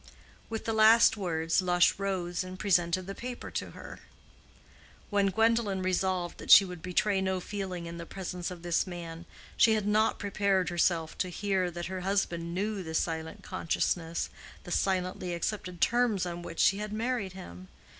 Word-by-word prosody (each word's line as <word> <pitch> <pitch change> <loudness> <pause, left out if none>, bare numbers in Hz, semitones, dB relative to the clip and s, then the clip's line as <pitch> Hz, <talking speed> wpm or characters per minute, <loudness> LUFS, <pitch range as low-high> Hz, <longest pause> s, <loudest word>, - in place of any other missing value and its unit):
With 225 -1 -4
the 225 - 0
last 220 +1 +6
words 165 -4 0
Lush 180 0 +3
rose 185 -3 -2
and 185 0 -8
presented 180 -2 +1
the 195 - -5
paper 245 +3 -7
to - - -3
her. - - -10 1.1
When 200 -1 +3
Gwendolen 225 -2 +1
resolved 185 -1 -1
that - - -9
she 200 - +10
would 180 -3 -8
betray 190 +2 +1
no 190 -1 0
feeling 185 -2 -5
in 170 0 -7
the 170 - -7
presence 180 -2 -5
of 180 -2 -9
this 175 +2 +1
man, 170 -2 -7 0.3
she 225 -2 +5
had 215 -2 -1
not 215 +2 +2
prepared 200 -2 0
herself 170 -2 +1
to 185 - 0
hear 190 0 0
that 175 0 -6
her 185 0 -4
husband 175 -3 -1
knew 205 +1 -1
the 160 -3 -6
silent 160 -1 -2
consciousness, 165 0 -1 0.3
the 175 - -9
silently 185 -1 -1
accepted 180 0 -4
terms 235 -6 +2
on 175 0 -5
which 170 -1 -8
she 195 - +4
had 210 0 -4
married 220 -3 -2
him. 95 - -10
185 Hz, 170 wpm, -29 LUFS, 175-200 Hz, 1.1 s, she